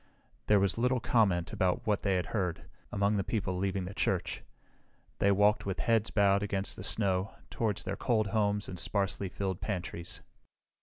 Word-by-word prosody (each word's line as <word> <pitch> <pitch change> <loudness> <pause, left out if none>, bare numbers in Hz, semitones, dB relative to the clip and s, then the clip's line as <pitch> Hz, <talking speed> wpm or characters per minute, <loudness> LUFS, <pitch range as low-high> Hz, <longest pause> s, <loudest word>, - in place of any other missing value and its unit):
There 105 -1 +5
was 100 +2 +1
little 125 +1 +2
comment 95 -8 +2
about 90 -1 0
what 105 -2 +1
they 95 -2 +1
had 90 -2 0
heard, 90 -6 -2 0.3
among 100 +1 +1
the 100 - 0
people 95 -4 -2
leaving 95 -1 -1
the 95 - -6
church. - - -1 0.8
They 100 - +4
walked 105 +1 +3
with 95 - -2
heads 115 -2 +2
bowed 100 -1 +3
against 100 -1 -1
the - - -8
snow 100 0 -1 0.2
toward 110 -5 0
their 95 +1 -3
cold 110 -4 +1
homes 105 0 0
and 90 - -5
sparsely 100 +1 0
filled 95 0 -3
pantries. 90 -3 -4
100 Hz, 170 wpm, -31 LUFS, 95-105 Hz, 0.8 s, There